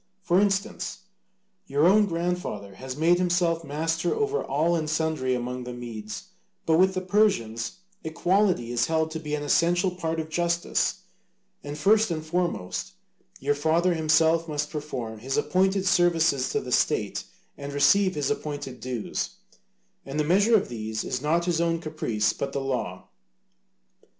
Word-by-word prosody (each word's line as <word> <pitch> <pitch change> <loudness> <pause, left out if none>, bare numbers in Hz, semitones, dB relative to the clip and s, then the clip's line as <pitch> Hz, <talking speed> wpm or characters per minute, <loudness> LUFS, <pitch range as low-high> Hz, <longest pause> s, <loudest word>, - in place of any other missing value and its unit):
For 185 +1 +3
instance, 200 -1 -1 0.7
your 145 +3 +2
own 205 +2 +5
grandfather 170 - -3
has 130 0 -7
made 170 +3 +4
himself 175 -2 +1
master 165 +3 -1
over 430 0 0
all 160 +5 +1
and 155 -2 -2
sundry 155 -5 0
among 125 +1 -4
the 125 0 -6
Medes, 115 -3 -7 0.4
but 160 0 +3
with 190 +1 +4
the 185 - -1
Persians 145 - +1 0.3
equality 175 - +1
is 120 -1 +1
held 160 0 0
to 160 - -4
be 150 -1 -3
an 145 - -4
essential 175 +5 +2
part 165 -2 -3
of 160 - -3
justice: 170 +1 0 0.6
and 145 +1 -6
first 215 +8 +4
and 155 -2 -3
foremost, 170 - -2 0.5
your 145 +2 +1
father 160 +5 +2
himself 160 +1 +3
must 150 -1 -3
perform 125 -8 -5
his 135 +4 -3
appointed 190 +4 +1
services 165 -7 +3
to - - 0
the - - -7
state - - +1 0.3
and 140 0 -7
receive 185 +6 +4
his 145 -1 0
appointed 145 -3 -4
dues: 125 -4 -4 0.7
and 140 +2 -5
the - - +3
measure 200 +8 +4
of 205 - +2
these 110 -2 -4
is 125 -1 -3
not 165 +4 +1
his 170 -2 +1
own 165 0 +1
caprice 150 -10 -1
but 140 0 -4
the 140 - -1
law. 135 -2 -3
160 Hz, 155 wpm, -26 LUFS, 135-175 Hz, 0.7 s, own